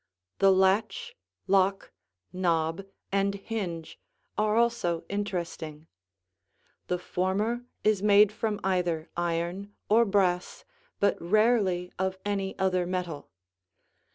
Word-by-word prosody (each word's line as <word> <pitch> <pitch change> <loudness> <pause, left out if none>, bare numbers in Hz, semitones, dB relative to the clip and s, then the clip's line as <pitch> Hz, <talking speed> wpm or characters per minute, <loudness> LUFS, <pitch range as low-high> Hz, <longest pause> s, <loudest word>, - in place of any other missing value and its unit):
The 195 0 +6
latch, 205 - +1 0.3
lock, 195 0 +2 0.4
knob, 170 0 0 0.2
and 200 0 +1
hinge 195 -6 -5 0.4
are 215 0 +1
also 230 -8 +1
interesting. 175 -6 -4 1.0
The 180 - 0
former 200 +7 -1 0.2
is 210 -3 +3
made 205 0 +6
from 215 -1 -2
either 175 -4 0
iron 175 +4 -2
or 230 +3 +5
brass 190 -3 0 0.3
but 200 - +2
rarely 190 -2 +2
of 190 0 -1
any 195 -2 -2
other 185 -2 +1
metal. 175 -5 -4
190 Hz, 100 wpm, -28 LUFS, 175-205 Hz, 1.0 s, The